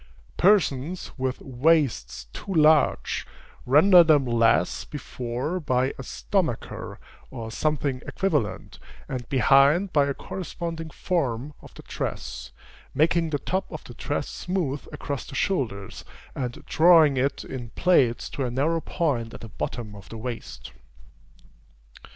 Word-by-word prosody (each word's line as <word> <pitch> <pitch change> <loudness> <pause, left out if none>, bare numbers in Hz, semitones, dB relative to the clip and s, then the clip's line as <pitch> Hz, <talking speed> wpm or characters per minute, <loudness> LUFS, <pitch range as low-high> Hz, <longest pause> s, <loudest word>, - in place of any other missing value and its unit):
Persons 175 -4 +2
with 130 -1 -2
waists 140 - +1
too - - -7
large, 155 -3 +3 0.4
render 175 +7 +7
them 150 -4 +4
less 115 -6 +2
before 130 +3 -4
by 130 -4 0
a - - -3
stomacher, 165 - -3 0.3
or 115 -3 -7
something 140 -1 -1
equivalent, 150 - -2 0.3
and 125 -2 -5
behind 140 - +4
by 145 -2 +4
a 140 - -2
corresponding 165 -2 -6
form 145 -5 -2
of - - -15
the - - -11
dress, - - -5 0.4
making 165 +1 +2
the 150 - 0
top 190 +6 -3
of - - -7
the - - -11
dress - - -3
smooth 170 -7 -3
across 140 -2 -5
the - - -9
shoulders, 115 - -2 0.3
and 125 -3 -5
drawing 160 -4 +6
it 135 +2 0
in 120 -3 -7
plaits 130 -10 +3
to 140 - -3
a 125 - -1
narrow 150 +7 0
point 130 -12 -2
at - - -11
the 115 - -9
bottom 110 0 -5
of 100 -2 -13
the 115 - -8
waist. 120 +1 -7
140 Hz, 135 wpm, -25 LUFS, 120-165 Hz, 0.4 s, render